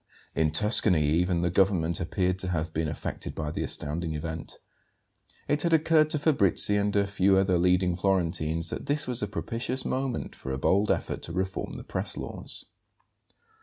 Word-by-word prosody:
In 80 -1 +2
Tuscany 90 0 +4
even 85 +2 +1
the 85 - +1
government 90 -3 +2
appeared 90 +2 -1
to 95 - -2
have 80 -2 -2
been 80 0 -1
affected 75 - -5
by 75 -1 -3
the - - -4
astounding 80 +2 -2
event. 80 +1 -5 0.9
It 145 +1 +1
had 170 0 +1
occurred 155 -1 +4
to 155 - +1
Fabrizi 105 - +3
and 105 0 0
a 100 0 +3
few 100 -1 +2
other 95 -2 +2
leading 90 0 +2
Florentines 85 -3 0
that - - -6
this 145 +2 0
was 125 -2 -3
a 105 - -1
propitious 120 +5 -3
moment 130 -2 -2
for 65 - -7
a 65 - -2
bold 100 +9 +2
effort - - -1
to 85 - -7
reform 95 +2 -3
the - - -7
press - - -3
laws. - - -4
95 Hz, 175 wpm, -27 LUFS, 80-105 Hz, 0.9 s, Tuscany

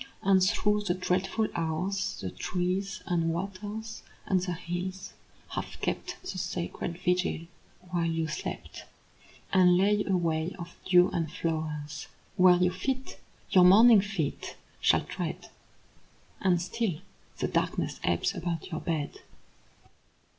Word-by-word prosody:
And 190 -1 +5
through 210 +2 +2
the 175 -2 +1
dreadful 190 +4 0
hours 170 +4 -1
The 95 - -4
trees 185 +2 -2
and 170 -2 +1
waters 205 +5 -5 0.2
and 185 -2 +2
the 180 -1 -2
hills 180 +2 -5 0.4
have - - -5
kept - - -3
The 280 - -5
sacred 175 -1 -3
vigil 180 -2 0 0.5
while 170 -2 +1
you 165 -1 0
slept, 150 - -6 0.7
And 180 -2 +6
lay 205 +2 +3
a 190 -2 +3
way 165 0 -1
of 170 -1 -8
dew 180 0 +6
and 165 -3 -1
flowers 155 -3 -3 0.3
Where 180 -2 +7
your 180 0 +2
feet, 260 +8 -3 0.3
your 185 - +7
morning 210 +4 +8
feet, 195 -7 -3 0.2
shall - - +4
tread. - - -5 0.9
And 180 -2 +3
still 180 -1 -2 0.4
the - - 0
darkness - - -1
ebbs 85 -1 +1
about 170 +1 -4
your 160 - -3
bed. 160 -4 -2
180 Hz, 130 wpm, -29 LUFS, 165-195 Hz, 0.9 s, morning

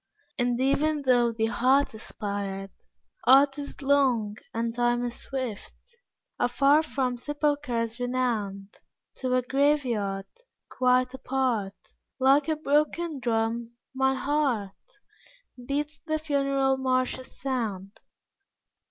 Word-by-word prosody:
And 245 0 +1
even 290 +3 +1
though 245 -3 +3
the 225 -1 0
heart 255 +4 +2
aspired, 200 -3 -5 0.6
Art 275 +2 +6
is 285 0 -7
long 255 -7 +2
and 230 0 -2
Time 240 0 +1
is 240 0 -4
swift. 255 -6 -5 0.6
Afar 280 +4 +4
from 260 -5 -2
sepulchres 260 -5 -1
renowned, 225 -6 -2 0.4
To 255 -1 0
a 255 - +2
graveyard, 245 -8 +1 0.4
quite 255 0 +2
apart, 250 -7 -1 0.4
Like 275 +3 +4
a 315 - +1
broken 305 +1 0
drum, 230 0 -1 0.2
my 265 0 +2
heart, 265 -8 0 1.0
Beats 295 +1 -2
the 310 -1 -2
funeral 275 -3 +1
marches' 255 0 -1
sound. 215 -7 -3
255 Hz, 105 wpm, -27 LUFS, 230-280 Hz, 1.0 s, Art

